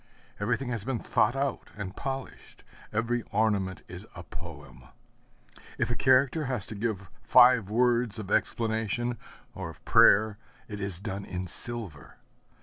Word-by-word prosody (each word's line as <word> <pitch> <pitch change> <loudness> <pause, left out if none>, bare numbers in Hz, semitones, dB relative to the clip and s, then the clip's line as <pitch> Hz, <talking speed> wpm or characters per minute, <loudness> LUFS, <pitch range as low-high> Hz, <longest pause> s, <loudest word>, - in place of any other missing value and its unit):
Everything 120 +5 -1
has 115 -5 -2
been 130 +1 -2
thought 115 +2 +1
out 135 0 -2
and 100 -1 -6
polished; 135 -1 -7 0.3
every 115 +3 0
ornament 100 -4 0
is - - -10
a - - -8
poem. 60 0 -11 0.9
If - - 0
a - - 0
character 135 +4 +3
has 125 -6 -2
to - - -7
give 100 -3 -3
five 120 -5 +6
words 120 0 +2
of 105 -2 -7
explanation 115 +1 0 0.3
or - - -6
of - - -14
prayer, 105 0 +5 0.3
it 105 -1 -7
is 100 -4 -3
done 100 0 -5
in 90 -1 -5
silver. 100 -5 -1
110 Hz, 145 wpm, -28 LUFS, 100-120 Hz, 0.9 s, five